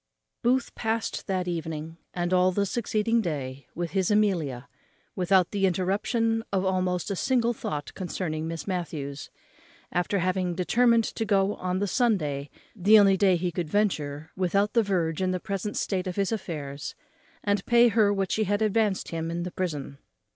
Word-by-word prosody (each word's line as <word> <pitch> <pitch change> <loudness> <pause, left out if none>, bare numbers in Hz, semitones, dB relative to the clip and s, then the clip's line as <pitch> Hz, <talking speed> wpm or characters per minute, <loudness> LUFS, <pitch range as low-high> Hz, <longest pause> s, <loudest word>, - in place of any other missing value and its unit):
_ - - -56
Booth 255 +1 +1
past 225 0 -2
that 185 -2 -1
evening, 165 -2 -4 0.2
and 175 0 -1
all 185 0 +4
the 200 +2 +1
succeeding 225 +1 0
day, 140 -7 -4
with 170 0 -3
his 190 -2 +1
Amelia, 175 - +1 0.5
without 185 0 +3
the 195 -2 +2
interruption 215 +5 0
of 190 -1 +1
almost 185 0 0
a - - -1
single 240 +2 +1
thought 150 -9 -5
concerning 160 -4 -3
Miss 165 -1 -5
Matthews, 150 -7 -4 0.6
after 180 +3 0
having 185 -1 0
determined 230 +5 +3
to 225 - -3
go 200 -1 +2
on 185 -1 -2
the 200 - 0
Sunday, 175 - 0 0.3
the 210 +2 +6
only 200 -2 +6
day 190 -1 +4
he 175 +1 -1
could 170 -2 -3
venture 155 -7 -1
without 195 +3 +1
the 235 - +5
verge 175 -5 0
in 185 - +1
the 185 0 -1
present 200 +1 -4
state 185 -1 -1
of 180 - -3
his 200 0 0
affairs, 150 -9 -5 0.5
and 205 -1 +1
pay 240 0 +6
her 215 -2 +3
what 195 -2 -1
she 215 - +1
had 205 +2 +1
advanced 215 -2 +1
for 165 - -3
him 165 0 -2
in 170 +1 -3
the 180 - -5
prison. 150 -7 -4
185 Hz, 175 wpm, -27 LUFS, 170-210 Hz, 0.6 s, the